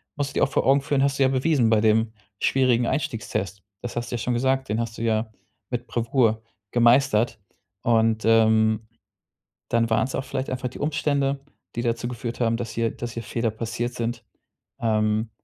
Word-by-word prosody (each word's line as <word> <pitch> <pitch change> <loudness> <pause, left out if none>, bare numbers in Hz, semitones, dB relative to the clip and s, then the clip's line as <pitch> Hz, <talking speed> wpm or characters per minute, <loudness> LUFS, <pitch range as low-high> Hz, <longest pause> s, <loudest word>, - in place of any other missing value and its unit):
musst 145 -1 -2
du - - -16
dir - - +4
auch - - -5
vor - - +1
Augen 135 +1 +5
führen, 140 -1 +1
hast 140 0 +1
du - - +5
ja 130 - +4
bewiesen 130 -3 +2
bei 110 -2 +4
dem 110 0 +2 0.3
schwierigen 125 -3 +2
Einstiegstest. 105 - -3 0.2
Das 120 - -6
hast 120 - -3
du - - -1
ja - - -1
schon 125 +2 -1
gesagt, 135 +2 0
den 110 - 0
hast 115 -1 -3
du - - -6
ja 110 -1 0 0.4
mit 120 0 -4
Bravour 115 -1 +1 0.3
gemeistert 120 -2 +3 0.4
und, 115 -1 +2
ähm, 110 -1 +4 0.8
dann 115 -1 +2
waren's 130 +4 +1
auch - - -3
vielleicht 130 0 -3
einfach 130 0 -2
die - - -11
Umstände, 145 -2 0 0.4
die 120 - -2
dazu 120 0 -1
geführt 120 -1 -5
haben, 115 -1 +2
dass 115 -2 -5
hier 115 -1 0
dass 120 -1 -6
hier 115 - -5
Fehler 115 -1 -1
passiert 115 +2 -3
sind. 120 0 -4 0.5
Ähm, 110 -1 +1
120 Hz, 190 wpm, -24 LUFS, 110-130 Hz, 0.8 s, Augen